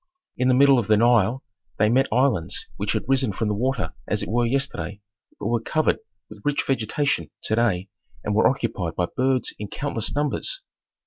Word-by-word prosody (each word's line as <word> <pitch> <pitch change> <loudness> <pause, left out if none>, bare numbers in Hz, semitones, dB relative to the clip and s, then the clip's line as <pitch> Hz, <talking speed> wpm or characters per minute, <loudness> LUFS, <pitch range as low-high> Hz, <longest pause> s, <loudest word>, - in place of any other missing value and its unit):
In 125 - +1
the 130 - +4
middle 135 0 +6
of 110 - -2
the 110 -1 +5
Nile 120 +2 +3 0.3
they 105 - +4
met 130 +5 +3
islands 115 -8 +1
which - - -1
had - - -2
risen 135 -4 +2
from 105 +3 -2
the - - +1
water 120 -5 -1
as - - 0
it - - -5
were 120 +2 +2
yesterday, 115 - -2 0.4
but - - -6
were 115 +1 +1
covered 155 +6 +1 0.3
with - - -13
rich 145 -1 +1
vegetation 135 +3 0
to 110 - 0
day 105 -5 +1 0.4
and 105 - -1
were 105 - +5
occupied 115 -9 -2
by 90 - +1
birds 130 0 +1
in 105 - -4
countless 130 -1 -3
numbers. 150 - -1
120 Hz, 190 wpm, -24 LUFS, 105-135 Hz, 0.4 s, middle